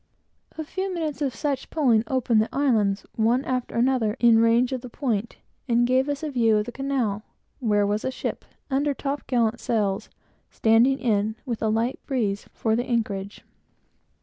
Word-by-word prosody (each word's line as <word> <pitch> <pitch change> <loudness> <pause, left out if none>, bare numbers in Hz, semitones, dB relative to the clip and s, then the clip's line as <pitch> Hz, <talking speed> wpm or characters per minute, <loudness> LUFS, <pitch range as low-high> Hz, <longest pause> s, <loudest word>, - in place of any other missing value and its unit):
A 315 - -3
few 375 +5 -4
minutes 315 -4 -3
of 270 -5 -1
such 275 0 -2
pulling 245 -9 +3
opened 240 -4 +2
the 220 - -1
islands, 215 -8 +1
one 235 +4 +2
after 255 -1 -2
another, 235 -3 +1
in 235 -2 +6
range 230 +2 +3
of 260 -2 -3
the 250 - -9
point, 235 -4 -2 0.3
and 240 0 +3
gave 260 +3 +2
us 285 +2 -3
a 305 - -2
view 225 -4 +3
of 210 - 0
the 245 - -6
Canal, 255 -6 -1 0.4
where 210 -5 +2
was 205 +1 -1
a - - 0
ship, 260 - -4 0.3
under 280 +1 +1
top 280 +1 -4
gallant 240 -2 +1
sails, 205 -4 -1 0.4
standing 230 +4 +3
in, 215 -4 0
with 235 -4 -4
a 220 - +1
light 225 +4 0
breeze, 215 -7 -1
for 220 -1 0
the 245 +2 -1
anchorage. 210 -5 -2
240 Hz, 175 wpm, -25 LUFS, 220-265 Hz, 0.4 s, in